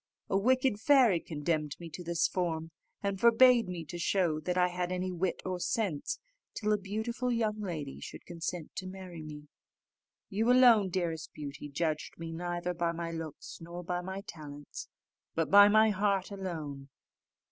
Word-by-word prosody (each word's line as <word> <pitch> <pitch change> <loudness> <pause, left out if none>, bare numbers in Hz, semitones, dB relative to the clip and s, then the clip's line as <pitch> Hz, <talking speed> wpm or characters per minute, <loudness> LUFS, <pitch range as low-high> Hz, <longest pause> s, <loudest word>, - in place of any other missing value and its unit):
"A - - +2
wicked 255 +2 +3
fairy 245 - +5
condemned 155 -2 -2
me 170 - -7
to 180 - -7
this 170 0 +1
form, 165 -3 -2 0.3
and 200 -1 -1
forbade 235 -1 +6
me 170 -3 -5
to 175 +3 -7
show 170 -3 +1
that 180 +3 -2
I 180 0 +4
had 180 0 -2
any 185 0 -1
wit 180 +1 -2
or 185 -1 -2
sense, 190 - -1 0.4
till 215 -1 +1
a - - +3
beautiful 220 +5 -2
lady 210 - -2
should - - -9
consent 170 -1 -5
to 185 - -4
marry 185 -3 -8
me. 150 -1 -9 0.8
You 225 +5 +2
alone, 240 -6 +6
dearest 170 -3 -2
Beauty, 145 0 -7
judged 155 +1 -2
me 165 0 -6
neither 175 +1 -3
by 170 -1 0
my 170 0 -4
looks 165 -2 -7
nor 170 +2 -7
by 175 +1 -2
my 190 +2 -5
talents, 145 -5 -9 0.5
but 165 -1 0
by 205 +1 +10
my 215 +1 +5
heart 200 -1 0
alone. 155 -8 -5
180 Hz, 165 wpm, -31 LUFS, 165-205 Hz, 0.8 s, by